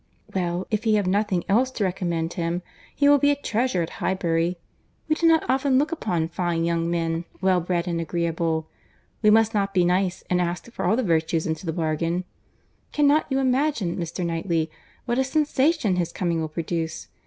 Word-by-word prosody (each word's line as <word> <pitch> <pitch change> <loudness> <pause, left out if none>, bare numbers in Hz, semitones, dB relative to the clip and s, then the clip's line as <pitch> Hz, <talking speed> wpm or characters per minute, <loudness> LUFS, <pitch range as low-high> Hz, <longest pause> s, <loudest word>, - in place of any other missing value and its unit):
"Well, 180 -1 -1
if 215 +1 -1
he 220 -1 +4
have 205 -2 +1
nothing 190 -1 +1
else 235 +7 +3
to 235 -5 -3
recommend 175 -3 -1
him, 170 0 -2 0.3
he 285 - +3
will 285 0 +6
be 285 - +4
a 290 - +3
treasure 235 -8 0
at 165 - -6
Highbury. 175 -1 0 0.5
We 310 - +3
do 330 +2 +2
not 325 -1 +4
often 265 +1 +2
look 295 +3 +1
upon 175 - -1
fine 170 -1 -1
young 170 0 0
men, 165 0 -1
well 185 -1 +2
bred 175 +1 -1
and 170 -1 -1
agreeable. 165 -1 -1 0.5
We 215 - +5
must 225 +1 +4
not 200 -1 0
be 180 -1 +4
nice 180 +1 +1
and 180 0 +1
ask 175 +6 -3
for - - -4
all 220 - +3
the 255 - 0
virtues 165 -3 +1
into 160 +2 -3
the - - +1
bargain. 165 +2 -1 0.7
Cannot 295 +1 +3
you 265 - 0
imagine, 260 - +1
Mr. 170 0 -3
Knightley, 165 -1 -1 0.3
what 240 +1 0
a - - +4
sensation 285 - +1
his 170 -1 -1
coming 170 -3 -1
will 160 - -3
produce? 165 0 -3
180 Hz, 190 wpm, -24 LUFS, 170-235 Hz, 0.7 s, will